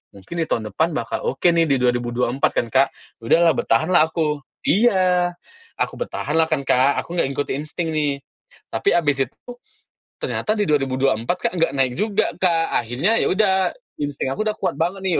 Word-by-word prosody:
mungkin 100 - -10
di 160 - -1
tahun 110 -3 -2
depan 160 +4 0
bakal 115 - -3
oke 135 - -4
nih 170 -1 +4
di 140 - +4
2024," 120 +1 0
kan - - +1
Kak. 135 +1 +4 0.3
Udahlah, 165 +9 +4
bertahanlah 155 +7 +2
aku. 150 -3 -1 0.2
Iya, 185 -5 +2 0.4
aku - - -1
bertahanlah 160 - 0
kan 150 -3 0
Kak, 130 +3 +3
aku 170 - -9
nggak - - +3
ikut 140 +1 -3
insting 155 +4 -4
nih. 145 -2 0 0.6
Tapi - - +2
abis 145 -5 +1
itu - - -39
tuh 245 0 -9 0.6
ternyata 215 0 -1
di 205 - +2
2024 135 -1 0
Kak, - - -1
nggak 165 - +2
naik 130 -2 +2
juga 210 -2 0
Kak. 165 -3 +2 0.2
Akhirnya 145 - +1
ya - - +2
udah, 190 -1 +2 0.3
insting 145 -2 -2
aku 215 - -2
udah 215 - -2
kuat - - -2
banget 185 +4 -1
nih, 185 - +1
155 Hz, 180 wpm, -21 LUFS, 135-180 Hz, 0.6 s, nih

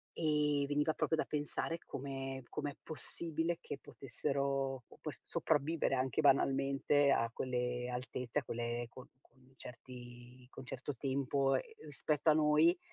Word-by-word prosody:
e 150 -2 +2
veniva 145 +2 +2
proprio 160 - +1
da - - +1
pensare 150 +3 -2
come 135 -1 -4
come 145 -1 -2
è - - -16
possibile, 165 +1 -2
che 140 - -6
potessero 135 0 -1
op - - -7
s - - -9
sopravvivere 150 +3 +1
anche 130 +1 +1
banalmente 140 0 +4
a 115 -3 +3
quelle 125 -1 -1
alte 125 0 -4
cioè 150 - +1
quelle 120 0 -2
con 130 +1 -11
con 130 -1 -25
certi 125 0 -11
con - - -9
un - - -16
certo 130 +3 -4
tempo, 135 +1 +1
ehm, 150 +3 -5
spetto 150 +2 +1
a - - +8
noi, 155 +3 +5
135 Hz, 150 wpm, -36 LUFS, 125-150 Hz, -, a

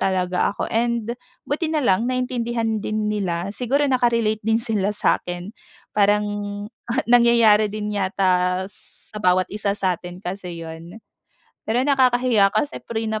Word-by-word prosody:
talaga 185 0 +1
ako - - -3
and 235 0 0 0.4
buti 310 +3 -1
nalang 240 -7 +2
naiintindihan 240 -3 -1
din 215 0 -1
nila, 185 -3 -2
siguro 270 +5 +1
naka-relate 235 -4 +1
din 225 0 +3
sila 210 -4 0
sa'kin 180 -1 -1 0.4
parang 210 0 +3 0.8
nangyayari 230 -3 +5
din 210 0 -3
yata 185 -2 +1
sa 210 - -12
bawat 185 -1 +2
isa 210 -1 0
sa 185 -3 0
atin 180 +1 -10
kasi 180 -2 -6
'yun. 165 +6 -9 0.7
Pero 240 +3 +2
nakakahiya 250 -6 +3
kasi 295 -1 0
prenup 220 -1 -3
215 Hz, 125 wpm, -22 LUFS, 190-235 Hz, 0.8 s, nangyayari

